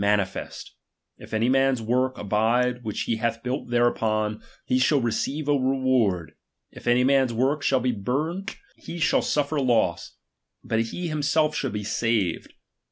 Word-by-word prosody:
nanifest; 100 -2 -1 0.5
if - - -13
any 110 +2 +1
man's 135 0 +3
work 125 +3 0
abide, 120 +4 +1
which 110 -2 -3
he 115 - -1
hath 115 0 -2
built 125 +2 -3
thereupon, 110 -3 +1 0.2
he 130 - +1
shall 140 +3 +3
re 120 -2 0
ceive 145 +6 -2
a - - +3
reward; 130 - +1 0.4
if - - -12
any 120 +1 +4
man's 135 -1 +3
tvork 135 +6 +1
shall 130 -2 +2
be 125 +1 +1
burnt, 150 - -3 0.2
he 170 - -8
shall 165 - +2
sifter 145 +1 0
loss, 110 -9 0 0.5
but 110 0 0
he 170 +10 -4
himself 155 0 +1
shall 135 - -1
be 105 -2 -4
saved. 105 -4 -1
125 Hz, 160 wpm, -25 LUFS, 110-135 Hz, 0.5 s, any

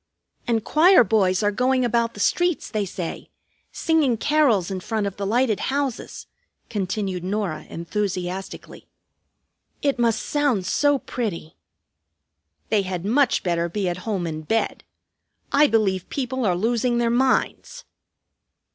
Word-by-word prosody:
"And 225 -2 +1
choir 330 +4 +6
boys 195 -3 +2
are 205 - +2
going 255 +3 +1
about 235 -1 0
the - - -9
streets, 350 - +1
they 215 -3 -1
say, 180 -2 -6 0.4
singing 310 -8 +1
carols 245 - +2
in 190 - -3
front 215 +2 -2
of 200 -1 -4
the 200 -1 -3
lighted 230 0 +1
houses," 275 -3 -3 0.5
continued 190 -3 -2
Norah 190 -4 -3
enthusiastically. 185 +1 -5 1.0
"It 280 -3 +1
must 230 -2 +1
sound 280 -10 0
so 290 +6 +2
pretty!" 210 -12 -5 1.1
"They 215 -2 +3
had 185 -2 -4
much 260 +6 +2
better 170 -1 0
be 195 +1 -2
at 175 0 -2
home 190 -2 -3
in 155 -1 -4
bed. 225 +9 -1 0.7
I 295 +1 +5
believe 200 -6 0
people 260 -3 -2
are 180 - +2
losing 235 +5 0
their 235 -1 +1
minds!" 265 - 0
220 Hz, 135 wpm, -23 LUFS, 190-255 Hz, 1.1 s, choir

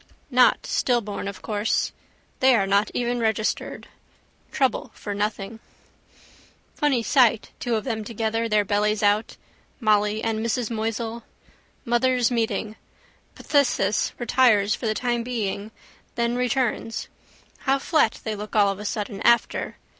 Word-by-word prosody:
Not 250 0 +4
stillborn 210 -6 -1
of 200 - -7
course. 210 0 0 0.5
They 260 -1 +5
are 200 -4 +2
not 200 +2 +2
even 245 0 0
registered. 220 -1 -1 0.6
Trouble 270 -4 0
for 205 - -5
nothing. 210 +1 -3 1.1
Funny 275 -6 +1
sight 235 -4 +3
two 240 -2 -1
of 215 - -1
them 225 -4 -3
together, 225 +1 -2
their 210 -1 +2
bellies 210 +1 +1
out. 205 +2 +1 0.4
Molly 215 -1 +2
and 225 -1 -1
Mrs 230 0 -1
Moisel. 225 +1 -3 0.6
Mothers' 245 0 +2
meeting. 220 -2 -1 0.6
Phthisis 250 -8 +1
retires 230 -4 +3
for 230 - -3
the 215 - 0
time 240 0 0
being, 215 -4 -3 0.5
then 235 0 0
returns. 250 -2 -1 0.5
How 270 0 +1
flat 275 -4 +1
they 220 -1 -3
look 210 +1 -8
all 205 -2 +5
of 195 0 -3
a 210 - -7
sudden 205 -1 -4
after. 235 -1 +2
225 Hz, 130 wpm, -24 LUFS, 210-240 Hz, 1.1 s, They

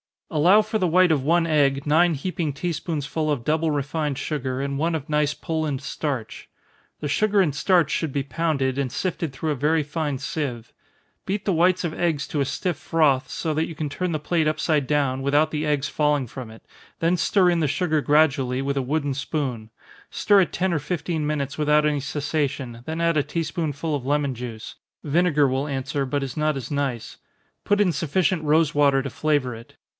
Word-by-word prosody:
_ - - -11
Allow 180 +8 +6
for 215 +1 -2
the 185 - +2
white 180 +1 +4
of 145 -4 +1
one 170 +3 +3
egg 140 -3 +2
nine 165 +3 +4
heaping 155 0 -3
tea 175 +6 -2
spoonsful 155 -1 -3
of 140 -6 -1
double 160 +4 +1
refined 145 0 -2
sugar, 130 -3 -3
and 140 0 -2
one 165 +2 +1
of 155 0 -5
nice 150 -1 +1
Poland 155 -4 -3
starch. 135 -4 -4 0.5
The 145 - -2
sugar 210 +6 +2
and 160 -6 +1
starch 165 +1 +2
should 160 -5 -1
be 140 - 0
pounded, 140 -2 -1
and 135 -3 -1
sifted 170 -4 -2
through 155 +3 -2
a - - 0
very 150 +4 +1
fine 145 -2 -3
sieve. 125 -8 -4 0.5
Beat 195 +1 -2
the 200 - 0
whites 180 +3 +3
of 165 -2 -2
eggs 160 -5 -1
to 150 - -2
a 140 - +2
stiff 175 +5 -2
froth, 150 -5 +1
so 160 -2 -2
that 160 +2 0
you 165 - -8
can 150 -1 -3
turn 180 +4 -2
the 155 - -1
plate 160 +1 +1
upside 155 -2 +1
down, 140 -3 +1
without 145 +3 +2
the 155 0 -2
eggs 145 -1 0
falling 150 -3 +1
from 125 0 -8
it 110 +1 -14 0.3
then 170 +2 +2
stir 185 +1 +3
in 170 - +1
the 155 - +1
sugar 155 +2 0
gradually, 140 -4 +2
with 140 +1 -2
a - - +2
wooden 145 +2 -1
spoon 130 -5 -3 0.4
stir 200 -1 +4
it 180 - -1
ten 185 0 0
or 155 - +1
fifteen 155 0 -2
minutes 140 -2 -2
without 150 0 +3
any 150 -1 +1
cessation 140 -3 -3
then 160 +1 -3
add 170 -1 +2
a - - +4
tea 165 +3 -2
spoonful 155 -1 -3
of 140 -4 -3
lemon 145 -1 +1
juice, 115 -2 -7 0.3
(vinegar 150 -1 +3
will 135 +2 -1
answer, 140 0 -2
but 140 +1 -1
is 135 0 -6
not 155 0 +1
as 130 0 -7
nice) 140 -5 -3 0.5
put 205 0 +3
in 190 -4 +3
sufficient 170 +2 0
rosewater 145 -3 +3
to 140 - -4
flavor 145 -5 0
it. 115 +1 -12
150 Hz, 205 wpm, -24 LUFS, 140-165 Hz, 0.5 s, Allow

